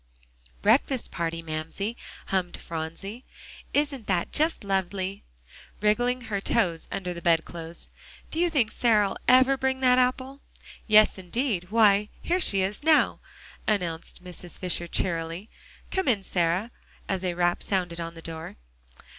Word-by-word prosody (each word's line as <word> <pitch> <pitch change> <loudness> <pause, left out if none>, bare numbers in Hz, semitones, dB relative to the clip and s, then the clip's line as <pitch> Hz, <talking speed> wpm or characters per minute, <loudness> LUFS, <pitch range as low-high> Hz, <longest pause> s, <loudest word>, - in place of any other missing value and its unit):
"Breakfast 265 -4 +2
party, 165 0 -3
Mamsie!" 160 +8 -4 0.3
hummed 185 -2 -1
Phronsie; 170 +8 -6 0.5
"isn't 285 -6 0
that 180 -3 0
just 315 -3 +2
lovely?" 195 0 -2 0.6
wriggling 245 +4 +2
her 210 -4 -3
toes 170 -4 0
under 180 -2 -3
the 170 - -8
bed 165 -1 +3
clothes. 170 0 -9 0.4
"Do 320 - -2
you 350 0 +3
think 260 -9 +1
Sarah'll 210 -5 +2
ever 260 +2 +6
bring 265 0 0
that 250 -1 +5
apple?" 260 +2 0 0.5
"Yes, 215 -2 +6
indeed 190 0 -1
why, 210 -1 +4
here 360 +2 0
she 195 - +1
is 195 +2 -3
now!" 310 0 +4 0.5
announced 180 -4 -2
Mrs. 180 -1 -7
Fisher 175 -1 -2
cheerily. 170 +3 -2 0.4
"Come 380 -3 0
in, 215 -6 +2
Sarah," 180 +5 0 0.4
as 190 -1 -2
a 180 -2 -1
rap 175 0 +1
sounded 180 -3 -1
on 165 0 -5
the 165 - -11
door. 160 -1 -6
195 Hz, 140 wpm, -27 LUFS, 175-245 Hz, 0.6 s, ever